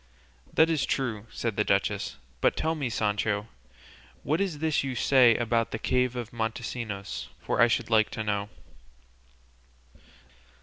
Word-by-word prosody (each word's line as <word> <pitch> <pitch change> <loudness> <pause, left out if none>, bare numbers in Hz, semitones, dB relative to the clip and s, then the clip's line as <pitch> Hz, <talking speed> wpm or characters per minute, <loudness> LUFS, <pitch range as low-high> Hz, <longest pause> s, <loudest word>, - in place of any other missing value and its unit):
"That 160 - +5
is 160 -3 +1
true," 115 -5 -2
said 115 -4 -3
the 105 - +3
duchess; 100 -8 0 0.2
"but - - +3
tell 160 +1 +1
me, 145 -6 -2
Sancho, 105 -1 0 0.8
what 155 +7 +1
is 185 -6 -1
this 155 -1 +1
you 135 -2 -3
say 125 -3 +5
about 115 0 +1
the - - -3
cave 125 +2 +1
of 120 -2 -5
Montesinos, 110 -2 -4
for - - 0
I 120 - +8
should 115 - -1
like 110 -1 +4
to 110 - -4
know." 100 -1 -1
115 Hz, 145 wpm, -28 LUFS, 110-130 Hz, 0.8 s, I